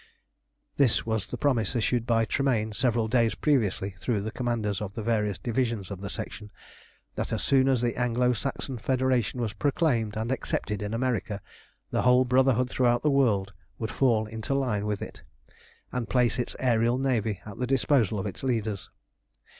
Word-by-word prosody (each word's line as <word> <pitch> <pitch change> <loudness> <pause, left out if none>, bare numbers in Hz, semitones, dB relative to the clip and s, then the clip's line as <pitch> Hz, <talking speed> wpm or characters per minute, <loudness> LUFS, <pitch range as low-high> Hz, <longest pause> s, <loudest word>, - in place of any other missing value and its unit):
This 135 -5 +3
was 110 -3 -1
the - - -5
promise, 125 -5 +1
issued 120 0 0
by 115 -1 +3
Tremayne 115 -2 0
several 115 -1 +1
days 115 -1 +2
previously 105 -9 +1
through 95 +3 -2
the 110 +2 -4
commanders 115 -5 -2
of 100 -1 -5
the 110 - -4
various 105 -3 0
divisions 115 -5 -2
of 95 -1 -6
the 100 - -5
Section, 105 +1 -6 0.6
that - - -3
as - - -1
soon 135 -1 +4
as 130 -3 +2
the 120 -1 0
Anglo 125 0 +2
Saxon 130 +1 -4
Federation 130 0 +1
was 110 -3 -2
proclaimed 125 -8 0
and 110 +3 -2
accepted 105 -5 -2
in 105 +2 -3
America, 115 -4 -1 0.5
the - - +1
whole 125 +1 +5
Brotherhood 125 0 +3
throughout 120 -1 +2
the 150 - +3
world 105 -8 +2 0.2
would 110 - -4
fall 115 -5 +2
into 110 +5 -3
line 110 -7 0
with 105 -1 -2
it, - - -9 0.7
and 125 -2 -3
place 125 -1 +2
its 120 - -2
aërial 120 0 +2
navy 115 -7 0
at 105 -2 -9
the 125 - -1
disposal 130 -5 +2
of 95 - -3
its 100 - -5
leaders. 110 -6 -2
115 Hz, 175 wpm, -27 LUFS, 105-130 Hz, 0.7 s, whole